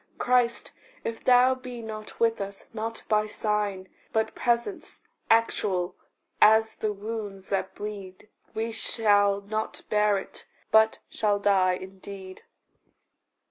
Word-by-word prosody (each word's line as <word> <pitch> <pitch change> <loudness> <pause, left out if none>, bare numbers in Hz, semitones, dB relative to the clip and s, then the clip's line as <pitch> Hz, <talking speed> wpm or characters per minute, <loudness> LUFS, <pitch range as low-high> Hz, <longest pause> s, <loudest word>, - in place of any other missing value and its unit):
Christ, 245 -1 +1 0.3
if 230 0 -4
thou 250 +1 +6
be 255 -2 -8
not 215 -1 -8
with 230 -2 +2
us 200 0 -6
not 225 +1 -4
by 215 -1 +2
sign, 210 -3 -1 0.2
But 220 0 0
presence, 245 +9 -1 0.3
actual 200 -5 +2 0.5
as 220 +1 +6
the 215 - -2
wounds 205 -2 -6
that 195 -1 -1
bleed 205 -1 -7 0.3
We 225 +1 -1
shall 205 -3 +2
not 215 +2 -4
bear 210 -1 +3
it, 195 - -7 0.2
but 220 0 +5
shall 205 -2 +1
die 195 -2 +3
indeed. 190 0 -8
215 Hz, 120 wpm, -27 LUFS, 200-225 Hz, 0.5 s, thou